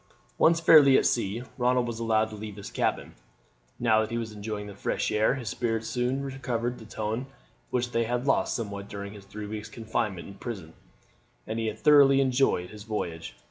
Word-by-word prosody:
Once 165 0 +5
fairly 150 -5 +7
at - - +2
sea 115 0 0 0.2
Ronald 125 0 +2
was 115 -1 -4
allowed 110 -1 +1
to - - -7
leave 105 -1 -7
his 100 -1 -8
cabin. - - -1 0.7
Now 110 -2 +4
that 110 - -2
he 115 - -2
was 115 -2 -4
enjoying 105 0 -5
the 100 - -8
fresh 95 - -2
air 110 +4 +3
his 120 -6 -5
spirits 115 +4 -2
soon 125 +3 -1
recovered 125 -3 -3
the 110 - -11
tone 110 +4 -3 0.4
which 120 -1 -1
they 115 -1 +1
had 120 +2 -1
lost 135 - +2
somewhat 100 -3 -5
during 100 0 -6
his 100 -2 -12
three 105 +2 -7
weeks' 105 +1 -6
confinement 110 -5 -3
in 100 - -9
prison, 95 -6 -7 0.7
and 110 +1 -3
he 110 -1 0
thoroughly 140 +3 +6
enjoyed 130 -9 +2
his 105 -1 -10
voyage. 90 -6 -4
110 Hz, 190 wpm, -27 LUFS, 105-125 Hz, 0.7 s, fairly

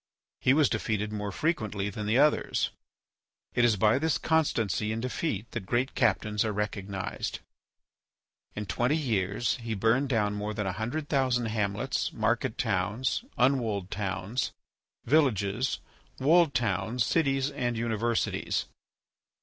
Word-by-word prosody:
He 130 - +4
was 150 -2 +5
defeated 105 -2 -1
more 105 -1 -3
frequently 105 - -1
than 105 +2 -5
the 110 +3 +3
others. 150 +2 +2 0.8
It 120 - +2
is 120 -3 +5
by 110 +5 +3
this 160 -1 +1
constancy 115 - +1
in 110 - -2
defeat 120 - -3
that 105 -5 -5
great 125 +2 0
captains 105 -2 +1
are 110 - -1
recognized. 100 -2 -3 1.2
In 105 - -3
twenty 125 +9 +1
years 110 -5 0
he 115 -2 -4
burned 115 +7 +2
down 105 -5 +1
more 105 +1 -3
than 105 - -2
a 95 - 0
hundred 120 +10 -3
thousand 130 -5 +1
hamlets, 110 +4 -1
market - - 0
towns, 105 - 0
unwalled 115 -7 +1
towns, 100 +3 -2 0.5
villages, 125 -4 +2 0.4
walled 160 +2 +4
towns, 115 +1 0
cities, 135 -3 +1
and 120 -4 -2
universities. 115 0 0
115 Hz, 130 wpm, -29 LUFS, 105-130 Hz, 1.2 s, was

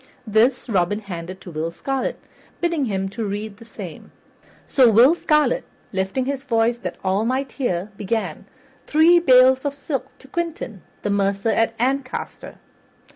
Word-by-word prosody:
This 235 +5 +2
Robin 195 -2 +1
handed 185 -3 -7
to 180 - -9
Will 160 +1 -2
Scarlet, 265 +10 -3 0.4
bidding 335 -5 0
him 195 -4 -1
to 225 +4 -5
read 205 0 -4
the 230 - -14
same. 230 - -9 0.6
So 255 -4 +5
Will 235 +8 +7
Scarlet, 305 +7 +2 0.3
lifting 195 +7 -1
his 275 0 -2
voice 235 -3 +1
that - - -5
all 190 +2 +1
might 260 +3 -1
hear, 205 -7 -2
began: 200 -4 -3 0.4
"Three 330 +3 +6
bales 260 -4 +6
of 285 -1 -2
silk 275 -2 -3
to 270 - -17
Quentin, 315 - -4 0.2
the 205 - 0
mercer 200 +1 +1
at 225 0 +1
Ancaster." 260 +2 -3
230 Hz, 150 wpm, -22 LUFS, 200-270 Hz, 0.6 s, Will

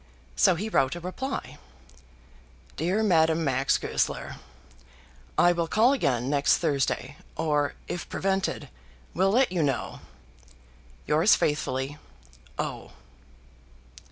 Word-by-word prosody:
So 65 - +4
he 200 +6 -3
wrote 135 -9 +1
a - - -6
reply, 240 +10 -5 1.2
DEAR 185 +8 0
MADAME 165 -4 +3
MAX 135 -1 +2
GOESLER, 65 +2 -2 1.0
I 175 - +6
will 170 -1 -1
call 230 +9 +4
again 130 - 0
next 140 0 +3
Thursday, 140 -2 -1 0.2
or, 150 -3 0
if 175 - -5
prevented, 195 0 -1 0.4
will 190 +2 +2
let 245 +3 +3
you 180 -2 0
know. 135 -5 -2 1.1
Yours 160 +7 +4
faithfully, 145 -1 -2 0.6
O. - - -5
160 Hz, 105 wpm, -26 LUFS, 140-190 Hz, 1.2 s, I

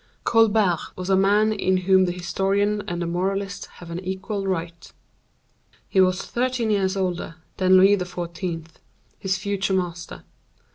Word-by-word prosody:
Colbert 215 -6 +3 0.2
was 185 +1 -3
a - - +5
man 205 +3 +3
in 190 -2 +1
whom 190 0 +5
the 175 - -1
historian 195 +4 0
and 175 0 -3
the - - -2
moralist 195 +3 -2
have 175 -1 -11
an 170 - -4
equal 190 +2 -4
right. 170 -2 -4 1.0
He 190 - +3
was 185 0 +2
thirteen 245 -2 -1
years 195 -1 +1
older 180 -3 -2 0.2
than 185 0 +5
Louis 195 +2 +6
XIV., 175 -2 -5 0.5
his 190 0 -1
future 195 0 -1
master. 175 -2 -4
190 Hz, 145 wpm, -23 LUFS, 180-200 Hz, 1.0 s, Louis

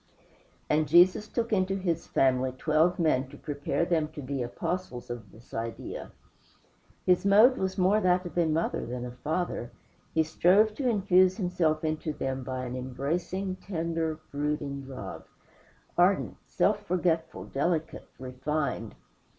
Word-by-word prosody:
And 155 0 +2
Jesus 180 +6 +5
took 230 -1 -2
into 190 -1 +2
his 175 -4 -2
family 130 -1 +2
twelve 155 +6 +2
men 140 -6 +2
to 145 - -12
prepare 145 +3 -2
them 165 -3 +1
to 150 - -6
be 140 +2 -3
the - - -2
Apostles 125 +1 -4
of 115 -5 -7
this 115 +3 -18
idea. 115 0 -5 0.9
His 180 -1 +4
mode 215 +6 +6
was 190 -3 -2
more 195 +3 +3
that 180 -1 +2
of 175 - -7
a 170 -2 +3
mother 160 +2 0
than 125 0 -5
a 125 - -6
father. 150 -1 -3 0.5
He 160 - +4
strove 185 +7 +4
to 255 +2 0
infuse 185 -3 +4
Himself 175 -5 0
into 155 0 -2
them 135 -2 -3
by 130 0 -4
an 125 0 -5
embracing, 165 +9 -3
tender, 165 -4 -2
brooding 145 -1 -3
love; 100 -11 -7 0.7
ardent, - - +2
self - - +1
forgetful, 170 -2 0
delicate, 160 +3 -2
refined. 130 +4 -3
160 Hz, 145 wpm, -28 LUFS, 135-180 Hz, 0.9 s, mode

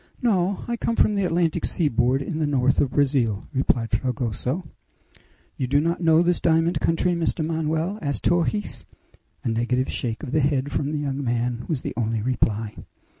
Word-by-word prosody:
"No! 195 -5 +1
I 235 0 -2
come 230 - -1
from 215 - +3
the 200 -2 +1
Atlantic 170 -2 +1
seaboard 135 -4 +2
in 155 +2 -4
the 155 - +1
north 135 -2 +2
of 135 - +1
Brazil," 130 -7 +1
replied 125 -3 +1
Fragoso. 125 - -2 0.9
"You 130 - -1
do 140 +3 +3
not 170 +3 0
know 165 0 +5
this 175 0 +1
diamond 165 +1 +2
country, 165 +2 +1
Mr. 165 -1 -1
Manoel?" 160 +4 -1
asked 140 -2 -2
Torres. 175 +4 0 0.6
A - - -3
negative 120 +3 0
shake 115 +1 -3
of 135 - -5
the 155 - +2
head 140 -1 +1
from 145 +1 -1
the 155 - -1
young 140 -1 -2
man 120 -1 -1
was 150 -6 -2
the - - -3
only 115 -2 -1
reply. 110 -3 0
145 Hz, 175 wpm, -24 LUFS, 125-165 Hz, 0.9 s, know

